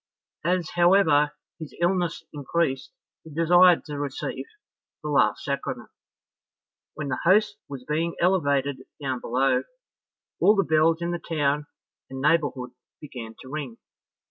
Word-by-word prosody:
As, 175 Hz, 0 st, 0 dB
however, 175 Hz, -5 st, +4 dB, 0.3 s
his 160 Hz, -3 st, -9 dB
illness 175 Hz, -1 st, 0 dB
increased, 145 Hz, -1 st, -1 dB, 0.3 s
he 160 Hz, -, -12 dB
desired 175 Hz, +3 st, +5 dB
to 145 Hz, -2 st, -6 dB
receive 145 Hz, -2 st, -4 dB, 0.6 s
the -, -, -4 dB
last -, -, +2 dB
sacrament. -, -, -4 dB, 1.0 s
When 150 Hz, -2 st, -4 dB
the 130 Hz, -, -2 dB
host 205 Hz, +3 st, +3 dB
was 135 Hz, -3 st, -7 dB
being 165 Hz, +3 st, -1 dB
elevated 145 Hz, -7 st, +1 dB, 0.2 s
down 135 Hz, -3 st, -3 dB
below, 130 Hz, +3 st, +1 dB, 0.8 s
all 210 Hz, -, +5 dB
the 195 Hz, -, +3 dB
bells 160 Hz, +1 st, +2 dB
in 170 Hz, -, -1 dB
the 175 Hz, -, -3 dB
town 150 Hz, -3 st, -1 dB, 0.4 s
and 135 Hz, 0 st, -7 dB
neighbourhood 145 Hz, -4 st, +1 dB, 0.3 s
began 120 Hz, -6 st, -9 dB
to 130 Hz, -, -12 dB
ring. 140 Hz, -5 st, -6 dB
155 Hz, 130 wpm, -25 LUFS, 140-170 Hz, 1.0 s, desired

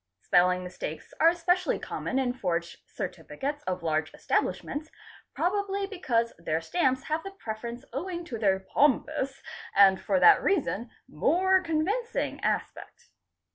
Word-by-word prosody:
Spelling 180 Hz, +1 st, +3 dB
mistakes 180 Hz, -3 st, -7 dB
are 325 Hz, -, +7 dB
especially 350 Hz, +1 st, +1 dB
common 260 Hz, -, -4 dB
in 255 Hz, -2 st, +1 dB
forged 175 Hz, -7 st, -2 dB
certificates 290 Hz, +2 st, -5 dB
of 185 Hz, -1 st, -3 dB
large 155 Hz, 0 st, 0 dB
establishments, 305 Hz, +2 st, -1 dB, 0.5 s
probably 400 Hz, +2 st, 0 dB
because 250 Hz, -, -1 dB
their 160 Hz, -1 st, -1 dB
stamps 260 Hz, -, 0 dB
have 310 Hz, +2 st, -1 dB
the 390 Hz, -, -7 dB
preference 235 Hz, -, -7 dB
owing 345 Hz, +5 st, -4 dB
to 235 Hz, -9 st, -6 dB
their 195 Hz, -3 st, +2 dB
"'pompous'' 275 Hz, +4 st, +1 dB, 0.3 s
and 195 Hz, -1 st, +6 dB
fot 280 Hz, -1 st, +1 dB
that 420 Hz, -2 st, +8 dB
reason 255 Hz, -, 0 dB, 0.2 s
more 370 Hz, -, +3 dB
convincing 375 Hz, +9 st, -1 dB
aspect. -, -, -3 dB
275 Hz, 130 wpm, -28 LUFS, -, 0.5 s, that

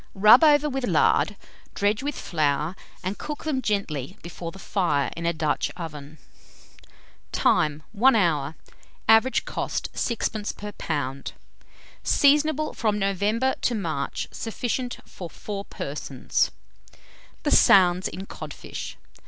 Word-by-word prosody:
Rub 215 Hz, +8 st, +8 dB
over 300 Hz, -1 st, +5 dB
with 270 Hz, -2 st, -3 dB
lard, -, -, +3 dB, 0.4 s
dredge 205 Hz, +3 st, +1 dB
with 285 Hz, 0 st, -3 dB
flour, 155 Hz, 0 st, 0 dB, 0.3 s
and 190 Hz, +3 st, -3 dB
cook 300 Hz, -1 st, -5 dB
them 290 Hz, -5 st, -1 dB
gently 195 Hz, -, -2 dB
before 170 Hz, 0 st, -6 dB
the 195 Hz, -, -13 dB
fire 175 Hz, -8 st, 0 dB
in 170 Hz, 0 st, -3 dB
a -, -, +3 dB
Dutch 155 Hz, -2 st, 0 dB
oven. 150 Hz, -3 st, -8 dB, 1.1 s
Time. 150 Hz, 0 st, +2 dB
1 235 Hz, +4 st, +4 dB
hour. 160 Hz, -7 st, +1 dB, 0.5 s
Average 225 Hz, +4 st, +4 dB
cost, -, -, -3 dB
6d. 220 Hz, -2 st, -2 dB
per 210 Hz, 0 st, -6 dB
lb. 140 Hz, -7 st, -3 dB, 0.7 s
Seasonable 300 Hz, +1 st, +3 dB
from 215 Hz, -3 st, 0 dB
November 210 Hz, +6 st, +1 dB
to 245 Hz, -, +1 dB
March. 165 Hz, -9 st, -3 dB
Sufficient 245 Hz, +2 st, -3 dB
for 175 Hz, -3 st, -9 dB
4 200 Hz, +3 st, -6 dB
persons. 140 Hz, -2 st, -2 dB, 0.9 s
THE -, -, 0 dB
SOUNDS 180 Hz, -1 st, +6 dB
IN 190 Hz, +4 st, -7 dB
CODFISH. -, -, -8 dB
195 Hz, 120 wpm, -25 LUFS, 160-235 Hz, 1.1 s, Rub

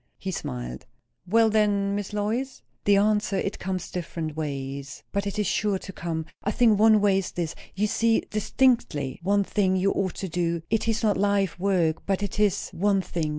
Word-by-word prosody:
He 190 Hz, -, -4 dB
smiled. 60 Hz, -, -5 dB, 0.4 s
"Well, 225 Hz, +3 st, +4 dB
then, 205 Hz, -2 st, +2 dB
Miss 205 Hz, 0 st, -3 dB
Lois?" 220 Hz, +6 st, -2 dB, 0.2 s
"The 205 Hz, -, +5 dB
answer? 210 Hz, -1 st, +2 dB
It 195 Hz, +2 st, -2 dB
comes 185 Hz, -2 st, -4 dB
different 165 Hz, -3 st, -4 dB
ways. 140 Hz, -2 st, -5 dB
But 200 Hz, 0 st, -1 dB
it 200 Hz, -, -4 dB
is 210 Hz, -, +1 dB
sure 205 Hz, -1 st, +1 dB
to 190 Hz, +1 st, -9 dB
come. 165 Hz, -2 st, -3 dB, 0.2 s
I -, -, 0 dB
think 220 Hz, -1 st, +3 dB
one 215 Hz, -1 st, +6 dB
way 200 Hz, -2 st, +4 dB
is 190 Hz, -, -4 dB
this, 170 Hz, -3 st, -2 dB, 0.2 s
You 205 Hz, +2 st, +1 dB
see 225 Hz, +2 st, +2 dB
distinctly 215 Hz, -, +1 dB
one 200 Hz, +3 st, +2 dB
thing 190 Hz, -1 st, +1 dB
you 190 Hz, +1 st, +2 dB
ought 190 Hz, -2 st, -1 dB
to 190 Hz, -, -4 dB
do; 170 Hz, -1 st, -1 dB
it 225 Hz, 0 st, +1 dB
is 225 Hz, 0 st, 0 dB
not 210 Hz, -2 st, +3 dB
life 200 Hz, -3 st, +1 dB
work, 180 Hz, -4 st, +1 dB
but 195 Hz, 0 st, 0 dB
it 200 Hz, +1 st, -4 dB
is 205 Hz, -2 st, +1 dB
one 195 Hz, +1 st, +1 dB
thing. 165 Hz, -3 st, -2 dB
195 Hz, 195 wpm, -26 LUFS, 170-210 Hz, 0.4 s, one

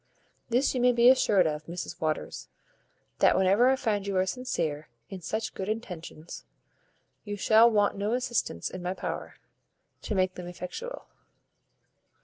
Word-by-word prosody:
This 245 Hz, +4 st, +2 dB
you 255 Hz, -, -1 dB
may 250 Hz, 0 st, +5 dB
be 240 Hz, +1 st, +6 dB
assured 205 Hz, -8 st, +4 dB
of, 155 Hz, 0 st, -3 dB
Mrs 170 Hz, +1 st, -6 dB
Waters, 155 Hz, -1 st, -3 dB, 0.7 s
that -, -, +5 dB
whenever 195 Hz, +7 st, +4 dB
I 265 Hz, -, +4 dB
find 210 Hz, -6 st, -1 dB
you 195 Hz, -1 st, -1 dB
are 185 Hz, -, +3 dB
sincere 170 Hz, -, -3 dB, 0.2 s
in 190 Hz, -2 st, -7 dB
such 220 Hz, +6 st, -3 dB
good 190 Hz, +1 st, -5 dB
intentions, 175 Hz, -7 st, -6 dB, 0.8 s
you 205 Hz, -1 st, -5 dB
shall 220 Hz, +3 st, +6 dB
want 205 Hz, -2 st, +2 dB
no 205 Hz, +3 st, -1 dB
assistance 240 Hz, -, -1 dB
in 185 Hz, -, -7 dB
my 180 Hz, +1 st, -3 dB
power -, -, -5 dB, 0.7 s
to 215 Hz, -, -3 dB
make 185 Hz, -1 st, +1 dB
them 180 Hz, -1 st, -8 dB
effectual." 180 Hz, -, -7 dB
200 Hz, 150 wpm, -28 LUFS, 180-235 Hz, 0.8 s, be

